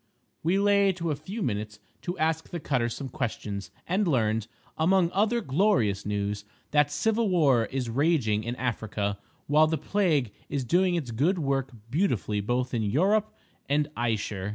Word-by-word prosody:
We 175 +4 +2
lay 200 -1 +4
to 170 -3 -2
a - - 0
few 190 +9 -5
minutes 105 -3 -3 0.2
to 175 +1 -4
ask 160 0 0
the 175 - -4
cutter 125 -6 0
some 135 +4 -5
questions, 105 -4 -4 0.2
and 190 +3 +1
learned, 110 -6 +1 0.3
among 175 +1 +3
other 220 +4 +2
glorious 135 - +1
news, 105 0 -2 0.3
that 145 -1 +4
civil 220 +8 +1
war 140 -10 +4
is 130 0 -3
raging 115 -5 +1
in 120 +3 -3
Africa, 110 -5 -2 0.3
while 155 +2 +5
the 160 0 0
plague 155 - +1 0.2
is 140 -2 -1
doing 180 +7 +3
its 145 -8 -3
good 150 - +1
work 135 -4 0 0.2
beautifully 125 - 0
both 125 +4 -1
in 115 - +1
Yurope 190 - +2 0.4
and 145 +1 +2
Ayesher. 105 -4 -2
140 Hz, 160 wpm, -27 LUFS, 110-175 Hz, 0.4 s, while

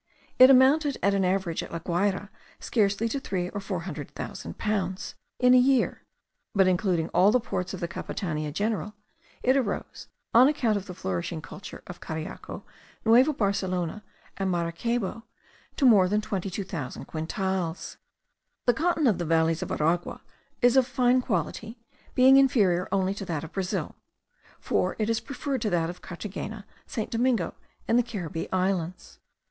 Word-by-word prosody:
It 255 +1 +10
amounted 275 +2 +5
at 200 - +3
an 195 -1 +2
average 185 -2 0
at - - -8
La 170 - -3
Guayra 190 +4 -1 0.3
scarcely 210 -1 +1
to 275 - -2
three 180 -7 -3
or 205 - -5
four 190 -3 -3
hundred 155 -5 -6
thousand 85 - -7
pounds 190 -3 -2 0.2
in 250 0 +5
a 255 - +8
year; 260 0 +2 0.5
but 190 -1 +5
including 180 -3 +1
all 195 +3 +4
the 250 - +4
ports 180 -5 -3
of - - -8
the 170 - -1
Capitania 155 -3 -4
general, 210 +4 -2 0.5
it 260 +1 +4
arose, 245 -7 -2 0.3
on 245 +3 +8
account 245 -7 +1
of 200 -1 -4
the 180 - -7
flourishing 95 - -3
culture 180 +4 -10
of 175 - -9
Cariaco, 160 0 -6 0.4
Nueva 245 +7 +6
Barcelona, 195 - -1 0.3
and 195 -1 -1
Maracaybo, 185 +6 -1 0.5
to 280 - +1
more 200 -7 +6
than 210 +2 +2
22,000 190 -7 -4
quintals. 175 +1 -3 0.7
The 245 - +5
cotton 330 +2 +1
of 210 -8 +3
the 175 - -2
valleys 165 0 +2
of - - -4
Aragua 165 +3 0 0.4
is 245 +1 +5
of 260 -2 +5
fine 250 -1 +3
quality, 220 +3 -3 0.4
being 260 +1 +7
inferior 205 -10 +3
only 190 0 +1
to 200 0 -6
that 165 -4 -3
of 160 - -8
Brazil; 190 -2 -3 0.6
for - - 0
it 220 +1 0
is 225 - +1
preferred 275 -2 -4
to 215 - 0
that 170 -2 0
of 180 - -14
Carthagena, 205 +3 -7 0.2
St. 220 - -4
Domingo, 235 -5 +1 0.3
and 230 +2 +4
the - - +3
Caribbee 180 -8 -5
Islands. 180 - -2
195 Hz, 160 wpm, -27 LUFS, 175-235 Hz, 0.7 s, It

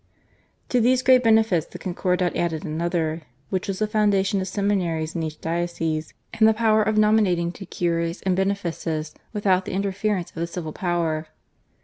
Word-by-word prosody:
To 250 - +2
these 255 +2 +3
great 255 0 +5
benefits 220 -7 +3
the - - -9
Concordat 180 -1 -1
added 170 0 -1
another, 165 0 -1 0.3
which 185 -1 -1
was 195 -1 -2
the 215 - +1
foundation 205 -2 +2
of 190 - -3
seminaries 180 -5 -1
in 170 - -1
each 155 -1 -5
diocese 165 -2 -2 0.2
and 220 0 +4
the 220 - +4
power 220 -1 +3
of 215 0 +1
nominating 210 -6 +3
to 195 +1 -10
cures 170 -1 -1
and 190 -1 +1
benefices 170 -5 -2 0.2
without 190 -3 +1
the - - -5
interference 195 -1 -1
of - - -18
the 170 +1 -1
civil 165 -3 -6
power. 165 -3 -1
185 Hz, 165 wpm, -24 LUFS, 170-210 Hz, 0.3 s, great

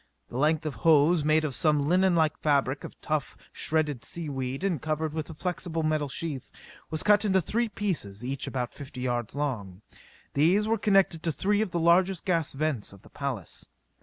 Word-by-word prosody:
The 120 - -6
length 155 +2 +2
of 155 - -2
hose 155 +5 +4
made 155 +1 +3
of 145 - -2
some 150 -1 +3
linen 185 +3 +3
like 155 -2 +2
fabric 140 -2 +1
of - - -9
tough, 155 -2 -2 0.2
shredded 150 -6 0
sea 165 +4 -4
weed 135 +2 -3
and 180 -8 0
covered 155 0 -2
with 155 0 -4
a 160 - -8
flexible 170 -1 -3
metal 155 -2 0
sheath 145 -2 -4 0.4
was 155 -1 0
cut 210 0 +5
into 190 -3 +3
three 230 +6 -1
pieces 150 - -3
each 135 +1 -3
about 125 -2 -3
fifty 135 -3 -9
yards 120 -2 -2
long. 110 -10 -3 0.5
These 180 +9 +3
were 225 0 +1
connected 195 -6 +3
to 165 - 0
three 205 +7 +1
of 220 - 0
the 170 - -2
largest 175 +2 +3
gas 165 -5 +1
vents 140 -8 -2
of 100 - -16
the - - -16
palace. 130 - -5
155 Hz, 190 wpm, -28 LUFS, 135-175 Hz, 0.5 s, cut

